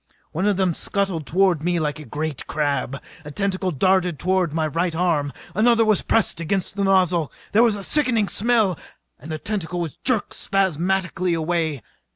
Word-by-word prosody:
One 185 +6 -1
of 205 -3 +2
them 190 -3 +2
scuttled 190 -4 -2
toward 185 -3 +2
me 175 +1 0
like 150 -1 -2
a 150 - -9
great 150 -1 -4
crab. 140 -2 -1 0.2
A 150 - -8
tentacle 190 +3 -1
darted 180 +1 +2
toward 185 -1 +1
my 160 0 0
right 165 +2 -1
arm. 160 -5 +1 0.2
Another 225 +3 +4
was 215 -2 +2
pressed 225 -6 0
against 190 +3 -1
the 200 - -1
nozzle. 185 -5 +2 0.2
There 215 - +5
was 230 -3 +4
a 200 - -6
sickening 240 -4 +2
smell 215 -6 +1 0.4
and 160 - -9
the 155 - -2
tentacle 175 -1 -3
was 165 -4 -4
jerked 245 -5 -1
spasmodically 185 -1 0
away. 160 -4 -1
180 Hz, 175 wpm, -22 LUFS, 160-195 Hz, 0.4 s, There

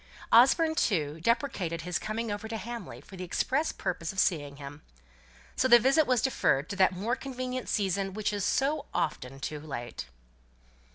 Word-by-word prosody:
Osborne, 295 +7 +6
too, 160 - 0
deprecated 190 - 0
his 180 +1 -2
coming 220 +1 -3
over 205 +2 -4
to 225 0 -4
Hamley 235 -2 -7
for 190 - -13
the 185 - -5
express 265 - 0
purpose 170 -2 -3
of 195 - -13
seeing 145 -7 +1
him. 145 +1 -9 0.7
So 260 - +2
the 240 -1 +9
visit 270 +6 +3
was 250 -3 +2
deferred 160 - +1
to - - -4
that 190 -1 +5
"more 215 +7 -1
convenient 255 -1 -5
season" 195 -1 0
which 215 -1 -1
is 205 -1 -2
so 280 +7 0
often 135 -3 -2
too 150 +2 -4
late. 120 - -6
205 Hz, 170 wpm, -29 LUFS, 165-250 Hz, 0.7 s, the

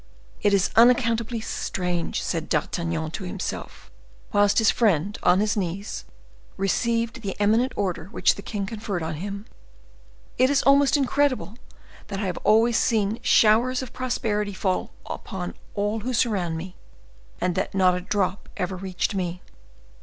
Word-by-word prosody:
"It 205 - +3
is 195 -2 +2
unaccountably 230 -1 +4
strange," 180 -5 -2
said 165 -2 -3
D'Artagnan 165 0 -1
to 195 - -5
himself, 185 +1 -6 0.4
whilst 205 0 +4
his 220 -2 +5
friend, 205 -3 +1
on 180 - +4
his 215 +2 +1
knees, 195 +1 -3 0.5
received 230 +4 0
the 200 -2 -5
eminent 225 +5 +3
order 180 -5 -2
which 200 - +2
the - - -9
king 205 -3 -4
conferred 205 -4 -4
on 160 0 -3
him—"it 200 - -5
is 280 -1 +2
almost 280 +1 +5
incredible 270 -5 0 0.5
that 195 -1 -4
I 205 - -2
have 180 -2 -2
always 225 +2 +4
seen 220 -2 +1
showers 240 +4 +4
of 255 -1 -9
prosperity 215 -5 -1
fall 185 -1 -1 0.2
upon 180 -2 -5 0.2
all 205 +2 0
who 250 +3 -3
surrounded 195 -9 0
me, 180 +3 -8 0.6
and 180 0 0
that - - -2
not 185 -1 +4
a 180 - -2
drop 190 0 -1
ever 185 +1 -2
reached 185 +2 -2
me! 180 -2 -3
205 Hz, 145 wpm, -25 LUFS, 185-230 Hz, 0.6 s, his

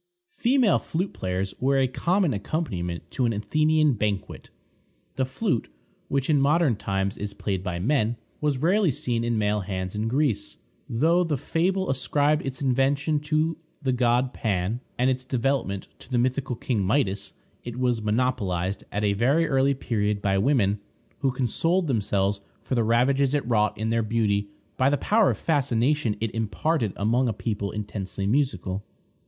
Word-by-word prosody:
Female 245 -4 +3
flute 180 +4 -3
players 95 +1 -2
were 135 +1 +2
a 135 -1 +3
common 175 +4 +1
accompaniment 100 - -3
to 130 -5 +1
an 115 - 0
Athenian 155 +7 +2
banquet. 105 -3 -3 0.6
The 130 - 0
flute, 130 - -1 0.4
which 135 -1 -1
in 150 -3 +3
modern 150 -2 +3
times 100 0 -2
is 100 -1 -5
played 95 -3 -2
by 90 -2 -3
men, 115 +3 +1 0.2
was 150 -3 0
rarely 185 +6 +3
seen 120 -3 -1
in 120 -1 0
male 105 0 +1
hands 95 -1 -4
in 105 +1 -2
Greece. 120 -5 0 0.3
Though 165 +9 +3
the 155 -4 -1
fable 185 +7 0
ascribed 145 +3 +1
its 135 +1 -4
invention 140 +3 +2
to 155 +2 0 0.3
the 130 - +1
god 125 +1 +2
Pan, 100 +2 -1 0.2
and 125 +2 +3
its 130 0 -3
development 130 -6 -1
to - - -14
the 125 - 0
mythical 130 +1 0
king 115 -1 -1
Midas, 100 -1 0 0.3
it 120 0 -6
was 125 -3 +1
monopolized 105 -5 0
at 105 - -2
a 100 -1 +2
very 135 +11 +2
early 135 0 +2
period 105 -5 -1
by 95 -1 +1
women, 105 -4 +2 0.4
who 135 - +2
consoled 165 - +1
themselves 100 -6 0 0.2
for - - -4
the 120 -2 +2
ravages 130 +5 +2
it 145 - -1
wrought 105 -3 +2
in 110 +1 -1
their 115 0 +2
beauty 105 -2 0 0.3
by 130 +1 +4
the 145 - +2
power 215 +8 +3
of - - -1
fascination 140 -5 +1
it 115 -1 -2
imparted 115 - 0
among 120 +5 +1
a - - -1
people 105 -1 -3
intensely 100 -2 -4
musical. 100 -6 0
125 Hz, 165 wpm, -25 LUFS, 105-145 Hz, 0.6 s, by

